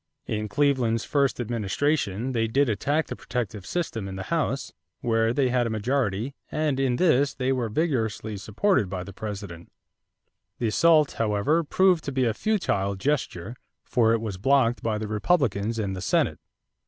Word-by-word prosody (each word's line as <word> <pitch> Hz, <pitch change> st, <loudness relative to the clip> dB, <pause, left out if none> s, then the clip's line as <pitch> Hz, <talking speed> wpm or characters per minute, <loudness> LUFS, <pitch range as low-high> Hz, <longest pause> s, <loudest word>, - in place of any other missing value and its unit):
In 105 Hz, -1 st, -3 dB
Cleveland's 125 Hz, -3 st, +1 dB
first 140 Hz, -3 st, +1 dB
administration 120 Hz, +1 st, -1 dB
they 115 Hz, -2 st, 0 dB
did 135 Hz, +4 st, +2 dB
attack 145 Hz, +9 st, 0 dB
the -, -, -6 dB
protective 110 Hz, -5 st, -4 dB
system 120 Hz, -, -3 dB
in 95 Hz, -, -6 dB
the 95 Hz, -, -5 dB
House, 140 Hz, -5 st, -1 dB, 0.3 s
where 115 Hz, -1 st, +2 dB
they 130 Hz, +1 st, +1 dB
had 125 Hz, -1 st, +1 dB
a -, -, -2 dB
majority, 115 Hz, +1 st, -1 dB, 0.2 s
and 150 Hz, -3 st, 0 dB
in 130 Hz, -2 st, +2 dB
this 140 Hz, -4 st, +3 dB
they 130 Hz, -1 st, 0 dB
were 125 Hz, -4 st, 0 dB
vigorously 110 Hz, -6 st, -1 dB
supported 110 Hz, -, +1 dB
by 90 Hz, -2 st, -4 dB
the 100 Hz, -, -10 dB
President. 100 Hz, -5 st, -7 dB, 0.9 s
The 115 Hz, -, 0 dB
assault, 155 Hz, +4 st, +4 dB
however, 115 Hz, +10 st, +2 dB
proved 180 Hz, +1 st, +3 dB
to 140 Hz, -, -2 dB
be 130 Hz, -1 st, +1 dB
a 115 Hz, -, +1 dB
futile 105 Hz, -, 0 dB
gesture 115 Hz, -, -2 dB, 0.3 s
for 115 Hz, -3 st, +2 dB
it 115 Hz, -, 0 dB
was 105 Hz, -4 st, -4 dB
blocked 125 Hz, 0 st, +3 dB
by 110 Hz, -2 st, -1 dB
the 110 Hz, 0 st, -4 dB
Republicans 110 Hz, -, +1 dB
in 100 Hz, -3 st, -2 dB
the 95 Hz, -, -5 dB
Senate. -, -, +1 dB
115 Hz, 165 wpm, -26 LUFS, 105-140 Hz, 0.9 s, assault